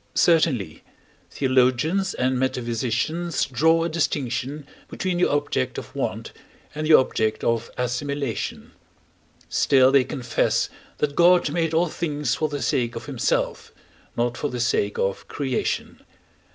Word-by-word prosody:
Certainly, 145 - +2 0.5
theologians 135 +8 +1
and 130 0 0
metaphysicians 130 +6 -1
draw 160 +6 +2
a - - 0
distinction 145 -3 -2 0.2
between 185 -2 -2
the 180 - +3
object 145 - -1
of - - -8
want - - -3 0.4
and 155 +1 -3
the 155 - +8
object 110 -4 +1
of 115 0 0
assimilation; 135 +1 -3 0.8
still 130 -2 +4
they 140 -1 +5
confess 120 -2 0 0.3
that 145 -1 -1
God 175 -3 +5
made 165 0 0
all 170 +2 +3
things 150 -2 -2
for 155 - -1
the 145 -1 -4
sake 120 -2 0
of 115 - -6
himself, 135 -5 -1 0.5
not 120 +1 0
for 145 - -2
the 125 - -5
sake 105 -4 0
of 95 0 -2
creation. 135 -3 -3
135 Hz, 130 wpm, -23 LUFS, 120-155 Hz, 0.8 s, the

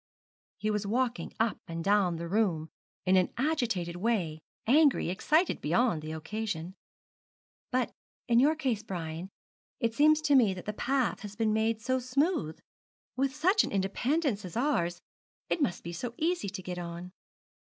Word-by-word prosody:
He 215 - -1
was 210 -1 -1
walking 245 +3 0
up 225 -3 +1
and 165 0 -4
down 195 -3 +3
the 170 +1 -5
room 175 -5 +1 0.4
in 185 0 +4
an 185 - +2
agitated 235 - 0
way, 180 -7 0 0.3
angry, 280 - +4
excited 310 - +2
beyond 175 +1 +2
the 155 +1 -6
occasion. 180 +1 -4 1.0
'But 255 -1 +1 0.4
in 235 -1 +5
your 295 +5 +4
case, 255 -9 -1
Brian, 175 -3 -5 0.5
it 230 -1 0
seems 305 +4 +5
to 300 -2 +2
me 225 -8 +5
that 180 - -8
the 210 - -3
path 260 +3 0
has 205 -1 -8
been 220 -1 +1
made 220 0 0
so 260 +1 +1
smooth. 255 - 0 0.6
With 270 +1 0
such 375 +8 +4
an - - -4
independence 215 - 0
as 180 +2 -6
ours, 175 - 0 0.5
it 335 - 0
must 185 -11 0
be 170 - -6
so 235 +7 -5
easy 335 - 0
to 190 -1 -7
get 180 0 -5
on.' 175 +1 -6
215 Hz, 160 wpm, -30 LUFS, 180-260 Hz, 1.0 s, in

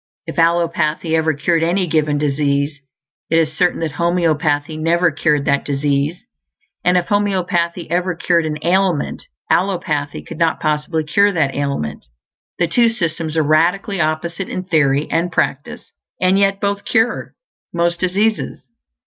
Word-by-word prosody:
If - - -5
allopathy 165 -1 +1
ever 160 -1 +1
cured 165 +3 +1
any 180 +3 +1
given 155 -3 +1
disease, 145 0 0 0.5
it 165 - +3
is 155 -1 +1
certain 180 0 +1
that 160 -2 -1
homeopathy 155 -2 0
never 165 +2 +2
cured 150 -1 +1
that 140 0 +1
disease; 145 +5 -1 0.6
and 180 0 +3
if 175 - -1
homeopathy 180 -4 0
ever 180 +1 0
cured 170 -1 +1
an 150 -1 -3
ailment, 180 -2 0 0.2
allopathy 160 -6 0
could - - -9
not 165 -1 +1
possibly 155 +1 -1
cure 200 +7 +3
that 145 -6 +1
ailment. 140 - -3 0.5
The 175 - +1
two 235 +7 +3
systems 165 -7 -3
are 160 - +3
radically 175 +6 +1
opposite 170 +4 -2
in 185 - -4
theory 150 -5 +1
and 175 +2 0
practice; 140 -3 -2 0.3
and 185 +2 +3
yet 195 0 +2
both 200 0 -1
"cure" 230 +2 0 0.4
most 170 0 0
diseases. 200 +2 0
165 Hz, 145 wpm, -18 LUFS, 150-180 Hz, 0.6 s, it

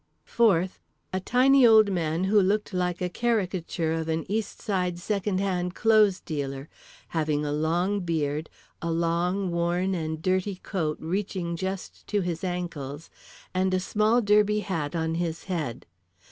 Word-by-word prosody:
Fourth, 190 -6 +2 0.3
a 185 - +1
tiny 260 +6 +4
old 220 -3 +7
man 165 -1 0
who 205 +2 +4
looked 205 +2 0
like 180 -1 -1
a 180 - +1
caricature 185 -6 -1
of 160 0 -2
an 160 0 -1
East 215 +1 -2
Side 180 -4 -1
second 200 +1 -1
hand 180 -2 -1
clothes 215 -4 +4
dealer—having 150 - -4
a 145 - -1
long 170 +7 +1
beard, 155 -3 -2 0.3
a 170 - -2
long, 170 +3 0
worn 175 +2 0
and 160 -3 -3
dirty 185 +3 0
coat 160 -6 -2
reaching 180 0 -2
just 190 +2 -5
to 205 -1 +1
his 175 -2 -3
ankles, 165 -5 -4 0.4
and 185 0 +1
a - - +2
small 215 +5 +2
derby 210 0 +3
hat 165 -7 -3
on 160 -1 -1
his 165 -1 -2
head. 160 -11 -4
180 Hz, 145 wpm, -26 LUFS, 165-200 Hz, 0.4 s, old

